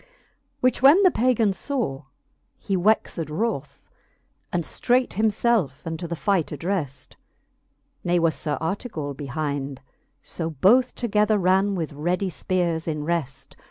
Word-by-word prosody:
Which 255 -1 +2
when 295 +9 +7
the 370 - +6
Pagan 230 -6 +2
faw, 180 - -3 0.5
he 195 - -2
wexed 180 -4 +1
wroth, 220 +10 -3 0.6
And 175 -3 0
ftreight 250 +10 +1
him 215 +3 +2
felfe 205 - 0
unto 165 +1 -4
the 170 - -3
fight 170 +2 +1
addreft 150 -5 -3
j - - -22 0.9
Ne 175 0 +2
was 165 -2 +2
Sir 150 -2 -3
Artegall 160 - -3
behinde: 140 0 -4 0.5
fo 165 -1 -4
both 215 - +3
Together 210 -2 +2
ran 190 +1 +2
with 160 -5 -3
ready 180 +6 -1
fpeares 170 +2 -1
in 150 -2 -2
reft. 145 -5 -3
175 Hz, 135 wpm, -24 LUFS, 150-215 Hz, 0.9 s, when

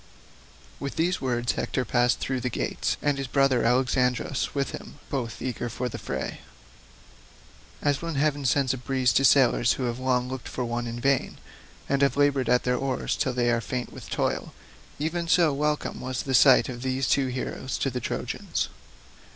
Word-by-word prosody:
With 140 - -4
these 175 +3 0
words 120 -2 0
Hector 130 - -2
passed 120 0 +2
through 130 -1 -2
the 125 - -2
gates, - - -2
and 145 -1 +1
his 135 - -3
brother 135 -2 +3
Alexandrus 125 +2 +1
with 140 -1 0
him, - - -8 0.2
both 120 -5 -3
eager 120 -1 -3
for 125 +2 -3
the - - -6
fray. 65 0 -4 1.4
As 145 -1 +1
when 165 -2 -3
heaven 145 0 +1
sends 135 0 +2
a - - -4
breeze 130 -2 +1
to 135 - +3
sailors 130 -3 +5
who 130 - -4
have 120 0 -2
long 125 -1 +1
looked 130 -1 -6
for 125 - -3
one 120 0 -2
in 115 +1 -5
vain, 135 +1 +1 0.5
and 140 0 +1
have 140 0 +3
laboured 140 -4 +2
at 125 0 +4
their 125 0 +1
oars 135 0 -1
till 130 - 0
they 120 -1 +2
are 120 -1 +1
faint 120 +2 -4
with - - -10
toil, - - -2 0.4
even 165 +3 -2
so 165 -3 +4
welcome 150 +1 -1
was 130 0 -3
the 135 - -3
sight 130 0 +6
of 120 -2 -6
these 130 +1 -1
two 135 -1 +2
heroes 130 +1 -4
to 135 - -1
the 125 - -3
Trojans. - - -3
130 Hz, 185 wpm, -26 LUFS, 125-140 Hz, 1.4 s, sight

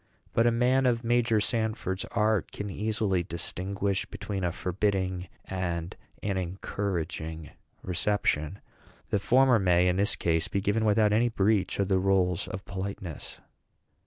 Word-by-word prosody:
But 115 +1 +4
a - - +5
man 125 +3 +3
of 120 -1 +1
Major 120 -1 +3
Sanford's 110 -4 -1
art 110 -2 +1
can 105 -1 -5
easily 105 -3 0
distinguish 95 +3 -2
between 100 -1 -5
a 90 - +1
forbidding 95 0 -1 0.2
and 85 -3 -3 0.3
an 100 -2 -1
encouraging 85 -4 -3 0.3
reception. 90 -2 0 0.5
The 105 - +2
former 125 +3 +4
may, 90 -2 +4
in 90 0 +2
this 100 +1 +2
case, 80 -1 0
be 100 - -1
given 105 +3 +1
without 105 0 +4
any 120 +3 +3
breach 105 -2 +1
of 100 - +2
the 95 -1 +3
rules 95 -2 +2
of 95 - -6
politeness." 95 -3 -6
100 Hz, 140 wpm, -28 LUFS, 90-110 Hz, 0.5 s, a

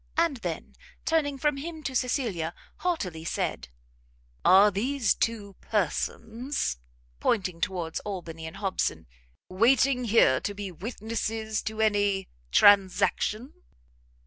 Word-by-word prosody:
And 330 -4 +2
then, - - -5 0.3
turning 295 -4 +1
from 295 0 +1
him 315 +2 -6
to 265 -2 -4
Cecilia, 225 - -1 0.2
haughtily 190 - -2
said, 65 - -3 0.7
"Are 195 +3 +7
these 235 +4 +1
two 210 -4 -2
persons," 225 - -2 0.4
pointing 185 -6 0
towards 175 -4 -2
Albany 170 -5 -6
and 160 +4 -9
Hobson, 185 - -1 0.4
"waiting 250 +5 +3
here 205 - +5
to 205 - -3
be 200 -1 -5
witnesses 220 +3 -3
to 220 0 -3
any 205 -3 +1 0.2
transaction?" 205 - +4
210 Hz, 110 wpm, -27 LUFS, 185-250 Hz, 0.7 s, Are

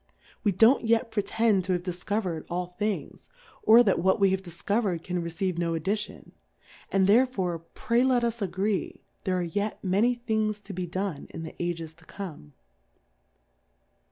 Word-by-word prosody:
We 205 - +3
don't 225 +9 +5
yet 230 +1 +2
pretend 215 -1 +2
to 185 - +1
have 175 -1 -1
difcover'd 180 -1 -3
ail 180 +1 -1
Things, 205 +4 -4 0.3
or 230 +3 +7
that 195 -6 +2
what 190 +4 +2
we 195 -1 +4
have 190 0 0
difcover'd 190 0 -1
can 180 -1 -2
receive 170 +1 -2
no 170 -1 0
addition; 200 +6 -3 0.6
and 195 -1 +3
therefore, 200 -6 +3 0.2
pray 235 +1 +2
let 255 -2 +3
us 235 -1 -1
agree, 195 +1 -1 0.2
there 185 -1 +1
are 180 - 0
yet 205 +5 -3
many 205 +6 +2
Things 220 -3 -1
to 200 0 -9
be 180 -1 -3
done 185 -3 -3
in 165 - -7
the 160 - -7
Ages 165 -2 -3
to 165 0 -18
come. 160 - -8
190 Hz, 160 wpm, -27 LUFS, 175-215 Hz, 0.6 s, or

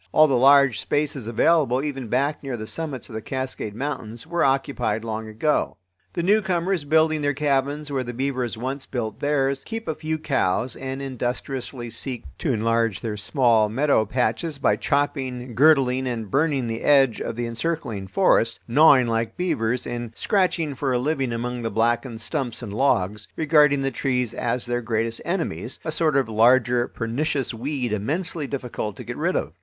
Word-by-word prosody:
All 155 - +6
the 140 - 0
large 135 -1 +5
spaces 145 -5 -1
available, 135 +1 +2
even 135 -5 -4
back 140 +6 0
near 135 -3 -4
the 110 - -6
summits 145 +1 -5
of 120 - -12
the 110 - -4
Cascade 130 -5 -4
Mountains, 120 -3 -4
were 170 +1 0
occupied 135 -5 0
long 110 -1 -4
ago. 110 +8 0 0.4
The 170 - -2
newcomers, 185 -4 +1
building 155 +1 +3
their 145 -1 0
cabins 145 +1 0
where 135 -2 -1
the 120 - -5
beavers 125 -2 -2
once 130 +3 -4
built 115 -4 -4
theirs, 140 -2 0
keep 225 -2 -6
a 160 - 0
few 155 +1 -3
cows 130 -6 0
and 135 +1 -5
industriously 125 -1 -4
seek 125 +1 -4 0.2
to - - 0
enlarge 115 -1 +1
their 110 -2 -3
small 110 0 +2
meadow 135 0 +2
patches 125 +6 -1
by - - +2
chopping, 130 -4 -1
girdling, 130 -1 +4
and 115 -5 -4
burning 140 -3 +1
the 115 0 -3
edge 135 -5 +4
of - - -3
the 120 +1 -2
encircling 115 -5 -3
forest, 115 - +2
gnawing 135 0 +6
like 115 -1 -1
beavers, 125 -9 -1
and 120 -1 -5
scratching 180 -7 +1
for 135 0 -2
a - - +2
living 135 -1 -1
among 120 +1 -3
the 115 - -2
blackened 115 +2 0
stumps 130 -2 -3
and 105 -4 -6
logs, 105 -4 +1
regarding 150 -3 +4
the 135 - 0
trees 125 -2 -1
as 120 +1 -2
their 120 0 -1
greatest 115 0 -1
enemies—a 170 -2 -3
sort 155 -1 +1
of 135 -3 +2
larger 120 +2 +3
pernicious 130 +3 -2
weed 125 -1 -3
immensely 150 - -2
difficult 125 -6 -4
to - - -8
get - - -6
rid - - 0
of. - - -2
130 Hz, 170 wpm, -23 LUFS, 115-145 Hz, 0.4 s, All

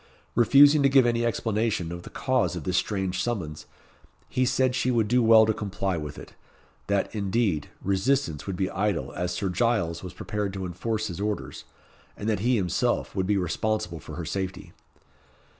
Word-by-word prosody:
Refusing 140 +5 +6
to 140 - +4
give 135 -2 +5
any 120 0 +1
explanation 110 -6 -1
of 85 0 -6
the - - -11
cause 130 -8 0
of 85 - -5
this 90 +3 -1
strange 95 -2 -1
summons, 85 -11 -4 0.6
he 130 - 0
said 130 0 +2
she 130 0 0
would 115 -4 +2
do 125 +3 +3
well 110 -1 +7
to 110 - +1
comply 100 -2 -2
with 75 -3 -6
it, - - -11 0.5
that, 100 -1 0
indeed, 100 -6 0
resistance 100 - 0
would 95 - -2
be 95 +1 0
idle 100 +1 -1
as 90 0 -2
Sir 95 +2 -2
Giles 90 -4 0
was 90 - -8
prepared 105 -2 -3
to 95 -1 -4
enforce 110 +5 -3
his 95 -2 -5
orders; 105 0 -4 0.5
and 105 - -5
that 110 -3 +1
he 120 +5 +2
himself 90 -6 0
would 95 -1 0
be 105 0 +2
responsible 90 -1 -1
for 75 - -9
her 85 0 -5
safety. 95 +2 -4
100 Hz, 180 wpm, -26 LUFS, 90-115 Hz, 0.6 s, well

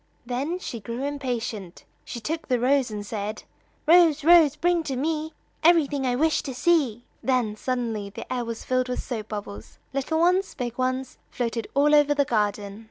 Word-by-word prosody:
Then 270 +8 -2
she 245 -10 -6
grew 235 +5 -5
impatient; 245 -9 -4 0.2
she 235 - -7
took 315 +7 -4
the 250 -2 +1
rose, 265 +1 +2
and 210 -1 -5
said: 210 0 -4 0.4
"Rose, 320 -2 +5
Rose, 325 -3 +6
bring 345 +2 +2
to 270 - -2
me 310 +3 -2 0.3
Everything 290 -5 +3
I 245 - +1
wish 315 +4 +2
to 265 -4 -6
see." 260 -7 +1 0.2
Then 250 -5 0
suddenly 225 -4 -3
the 200 - -8
air 250 -1 -1
was 230 -1 -6
filled 255 0 0
with 250 - -3
soap 220 -4 -5
bubbles; 200 - -7 0.2
little 275 +4 -1
ones, 365 +3 +2
big 240 -3 -4
ones, 255 0 -2
floated 230 -2 -3
all 290 +2 +4
over 290 0 +5
the 285 -1 +2
garden. 205 -3 -1
255 Hz, 175 wpm, -25 LUFS, 230-300 Hz, 0.4 s, Rose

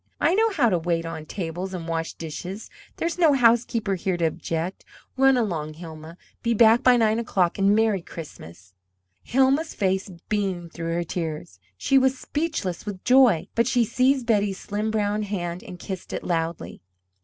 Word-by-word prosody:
I 335 - +3
know 445 +3 +3
how 290 - +2
to 180 -4 +1
wait 165 0 -1
on 160 -1 -6
table 185 +1 -4
and 170 -2 -6
wash 165 0 -3
dishes. 180 +6 -7 0.3
There's 335 +2 -2
no 320 -4 +5
housekeeper 230 -4 +2
here 185 0 -1
to 170 - +1
object. 165 +3 -3 0.3
Run 270 0 +4
along, 160 -9 -2
Hilma; 160 0 -10 0.2
be 235 -1 +1
back 225 +1 +6
by 250 -1 +5
nine 220 -1 +2
o'clock 190 -6 0
and 200 +1 +4
Merry 220 -3 +2
Christmas!" 95 - -11 0.5
Hilma's 270 +5 +1
face 190 0 0 0.2
beamed 190 -5 -2
through 165 0 -3
her 175 - 0
tears. 160 - -5 0.2
She 275 - +3
was 265 0 +2
speechless 290 - -3
with 205 -3 -7
joy, 250 -9 +5
but 230 0 +2
she 240 -2 +2
seized 255 +3 +2
Betty's 205 -4 +1
slim 210 +2 -3
brown 210 -1 0
hand 180 -4 -4
and 180 - -9
kissed 185 0 -7
it - - -4
loudly. 165 - -3
195 Hz, 170 wpm, -24 LUFS, 170-235 Hz, 0.5 s, back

